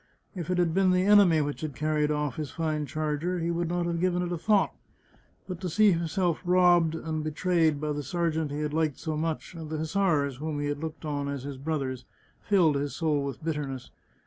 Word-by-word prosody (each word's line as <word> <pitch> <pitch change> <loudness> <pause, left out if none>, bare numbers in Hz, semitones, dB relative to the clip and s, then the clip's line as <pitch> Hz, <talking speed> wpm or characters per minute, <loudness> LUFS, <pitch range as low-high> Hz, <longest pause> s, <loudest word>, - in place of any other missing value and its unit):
If 175 -4 -6
it 180 - +1
had 175 -2 +2
been 190 +1 +3
the 180 0 +3
enemy 200 -6 +6
which 145 0 -3
had 155 -4 -4
carried 150 0 0
oflf 150 -3 -1
his 155 -3 -3
fine 155 -3 -2
charger 155 +4 -2
he 170 0 -1
would 170 0 -1
not 175 0 0
have 170 -1 -1
given 180 0 +1
it 175 - -3
a 175 - -1
thought, 205 +2 +2 0.7
but 185 -2 -6
to 185 - -2
see 210 +5 +5
himself 170 0 0
robbed 175 -2 +4
and 160 -1 -3
be 155 - -1
trayed 160 -1 +1
by 150 0 -2
the 145 0 -2
sergeant 160 +1 -1
he 145 +1 -4
had 150 -1 -2
liked 155 -3 0
so 160 -2 -3
much, 160 +2 -3
and 160 -3 -8
the 155 - -3
hussars, 155 -5 0
whom 150 +1 -3
he 145 - -2
had 145 0 -2
looked 160 +1 -6
on 145 -2 -2
as 140 -2 -4
his 140 -1 -6
brothers, 135 -4 -3 0.4
filled 170 -8 +3
his 140 0 -3
soul 155 -3 +1
with 140 +1 -5
bitterness. 145 -5 -4
160 Hz, 225 wpm, -28 LUFS, 150-175 Hz, 0.7 s, enemy